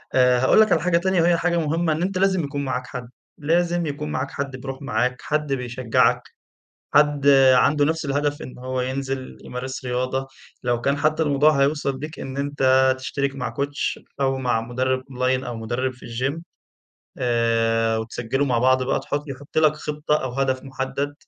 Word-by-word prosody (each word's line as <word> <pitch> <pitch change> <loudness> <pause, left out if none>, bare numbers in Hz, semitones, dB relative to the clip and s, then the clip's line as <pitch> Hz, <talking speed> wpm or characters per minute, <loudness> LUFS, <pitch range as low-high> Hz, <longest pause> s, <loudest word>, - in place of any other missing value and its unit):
آآ 125 -1 +5
هاقول 130 - +5
لَك 215 - +3
على 160 - +3
حاجة 175 -1 +2
تانية 185 0 +1
وهي 170 0 +4
حاجة 170 0 +1
مُهمّة 160 0 +1
إن 160 - -3
أنت 185 +1 -1
لازم 190 -3 +2
يكون 140 0 -3
معاك 130 -1 -3
حد، 125 -2 -7 0.3
لازم 170 +2 +1
يكون 150 +1 -4
معاك 130 0 -2
حد 140 -1 -4
بيروح 135 +1 -7
معاك، 125 0 -1
حد 150 -2 -1
بيشجَّعك، 125 -2 +1 0.7
حد 145 -1 +3 0.3
عنده 145 +3 +4
نفس 160 0 -1
الهدف 145 +1 -1
إن 130 - -9
هو 130 0 -3
ينزل 130 0 -4
يمارس 130 +1 -6
رياضة، 130 +2 -1 0.4
لو 120 -1 0
كان 140 +3 +1
حتى 155 +2 +1
الموضوع 145 0 +3
هيوصل 140 -1 +1
بيك 155 +3 -7
إن 135 0 -6
أنت 130 -2 +3
تشترك 140 +1 -2
مع 120 -4 -4
Coach 140 +3 -2 0.2
أو 135 -1 +1
مع 125 -3 0
مُدرِّب 130 +2 -1
اونلاين، 130 0 0
أو 120 -2 -5
مُدرِّب 120 +4 -2
في 130 - -17
الجيم 135 +8 -3 0.8
آآ 115 -2 +1
وتسجلوا 120 +5 -2
مع 125 -3 +1
بعض 130 +1 +3
بقى 130 - 0
تحط 145 0 -3
يحُط 140 +3 -5
لَك 155 -1 +5
خطّة 150 0 -1
أو 130 -2 -3
هدف 130 0 0
محدد، 135 +2 -3
135 Hz, 180 wpm, -23 LUFS, 125-150 Hz, 0.8 s, آآ